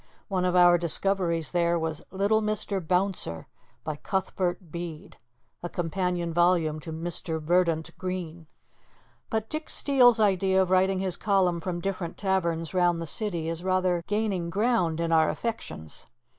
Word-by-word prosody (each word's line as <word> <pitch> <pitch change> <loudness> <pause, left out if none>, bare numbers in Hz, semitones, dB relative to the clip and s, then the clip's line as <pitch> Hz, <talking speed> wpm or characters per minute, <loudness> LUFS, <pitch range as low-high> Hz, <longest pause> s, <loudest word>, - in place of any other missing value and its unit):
One 185 -2 0
of 180 0 +1
our 175 -1 +6
discoveries 170 -1 +1
there 170 -1 +1
was 160 -2 -2
"Little 200 +3 +1
Mr. 210 -2 -1
Bouncer," 180 - -1 0.4
by 155 -2 -4
Cuthbert 185 -1 -3
Bede 170 +2 -7 0.4
a 175 - -5
companion 175 0 -2
volume 170 -3 +2
to 160 +2 -8
"Mr. 160 0 -1
Verdant 165 0 0
Green." 175 -3 -5 0.8
But 220 -1 -2
Dick 310 +4 -4
Steele's 250 -5 +5
idea 190 -2 +2
of 185 - -5
writing 190 +1 +3
his 185 -2 +1
column 190 -4 +1
from 175 0 -4
different 185 -3 -4
taverns 170 -4 -1
round 175 -2 +2
the 165 - -4
city 170 -3 0
is 165 +1 -3
rather 185 -2 +1
gaining 205 -5 -1
ground 195 -5 +1
in 165 0 -1
our 160 -1 +4
affections. 225 - -4
180 Hz, 145 wpm, -27 LUFS, 165-195 Hz, 0.8 s, our